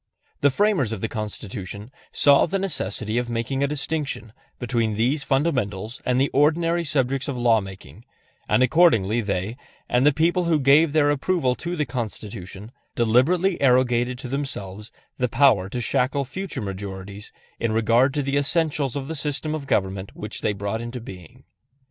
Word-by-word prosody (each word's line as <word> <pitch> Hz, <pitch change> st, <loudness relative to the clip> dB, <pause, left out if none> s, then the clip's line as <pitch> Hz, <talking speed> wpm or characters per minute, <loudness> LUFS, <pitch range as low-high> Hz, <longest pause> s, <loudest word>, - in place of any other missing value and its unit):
The 145 Hz, -, +4 dB
framers 170 Hz, -, +1 dB
of 110 Hz, -4 st, -4 dB
the 110 Hz, -, -1 dB
Constitution 105 Hz, 0 st, -6 dB, 0.2 s
saw 140 Hz, -1 st, +5 dB
the 195 Hz, -, -1 dB
necessity 120 Hz, -, -1 dB
of 120 Hz, -1 st, -4 dB
making 120 Hz, +3 st, -2 dB
a 140 Hz, -, +2 dB
distinction 145 Hz, -5 st, -3 dB, 0.2 s
between 115 Hz, -3 st, -1 dB
these 130 Hz, +7 st, +1 dB
fundamentals 125 Hz, -, -1 dB
and 125 Hz, 0 st, +1 dB
the 135 Hz, -, +2 dB
ordinary 165 Hz, +4 st, +2 dB
subjects 135 Hz, -3 st, -1 dB
of 140 Hz, -3 st, -3 dB
law 115 Hz, -2 st, +3 dB
making, 95 Hz, +4 st, -11 dB, 0.4 s
and 130 Hz, -, +4 dB
accordingly 120 Hz, -, +3 dB
they, 100 Hz, +2 st, -3 dB, 0.3 s
and 125 Hz, +1 st, +2 dB
the 145 Hz, -, +6 dB
people 170 Hz, +4 st, +1 dB
who 165 Hz, -2 st, +2 dB
gave 145 Hz, +3 st, +5 dB
their 145 Hz, -2 st, +4 dB
approval 145 Hz, -2 st, +1 dB
to 175 Hz, +7 st, -5 dB
the 150 Hz, -3 st, -1 dB
Constitution, 105 Hz, -4 st, -6 dB, 0.2 s
deliberately 150 Hz, -, +2 dB
arrogated 125 Hz, -1 st, +2 dB
to 130 Hz, -, -7 dB
themselves 105 Hz, -7 st, -5 dB, 0.3 s
the 125 Hz, -1 st, +1 dB
power 115 Hz, -7 st, +3 dB
to 125 Hz, -, -4 dB
shackle 135 Hz, +3 st, 0 dB
future 145 Hz, -, -5 dB
majorities 100 Hz, +1 st, -7 dB, 0.3 s
in 115 Hz, -, 0 dB
regard 115 Hz, +4 st, +3 dB
to 145 Hz, -, 0 dB
the 140 Hz, +1 st, 0 dB
essentials 145 Hz, -2 st, 0 dB
of 135 Hz, -1 st, -4 dB
the 160 Hz, -, -4 dB
system 150 Hz, +1 st, -2 dB
of 150 Hz, -3 st, -5 dB
government 95 Hz, -2 st, -1 dB
which 105 Hz, 0 st, -5 dB
they 105 Hz, -, 0 dB
brought 100 Hz, +3 st, -3 dB
into 120 Hz, +1 st, -6 dB
being. 90 Hz, -7 st, -12 dB
125 Hz, 165 wpm, -23 LUFS, 110-145 Hz, 0.4 s, the